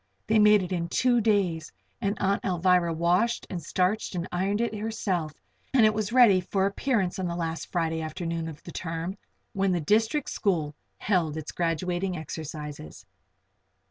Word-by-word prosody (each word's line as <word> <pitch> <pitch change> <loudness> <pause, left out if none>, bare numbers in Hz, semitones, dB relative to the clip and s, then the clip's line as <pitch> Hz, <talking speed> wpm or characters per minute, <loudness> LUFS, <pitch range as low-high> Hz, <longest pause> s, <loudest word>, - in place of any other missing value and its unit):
They 220 0 +3
made 210 -1 +6
it 180 - -6
in 170 -2 -1
two 245 +3 +3
days 190 -7 +1 0.3
and 200 -1 -1
Aunt 195 +1 +1
Alvirah 180 -1 +2
washed 180 +8 +1
and 180 -3 -3
starched 185 +6 -1
and 175 +1 -2
ironed 195 +4 0
it 235 -1 0
herself 205 -7 -2 0.4
and 235 -4 +6
it 215 - +4
was 215 0 -2
ready 230 -7 +6
for 190 +1 0
appearance 200 -2 0
on 185 - -1
the 170 - -3
last 165 -2 -4
Friday 165 -2 0
afternoon 165 +1 -3
of 155 -2 -9
the 170 - -9
term, 165 +2 -4 0.4
when 195 -1 +1
the 175 - +1
district 225 - +1
school 165 -8 0 0.2
held 170 -6 0
its 155 -1 -5
graduating 175 +2 -1
exercises. 150 - -7
180 Hz, 165 wpm, -27 LUFS, 165-205 Hz, 0.4 s, made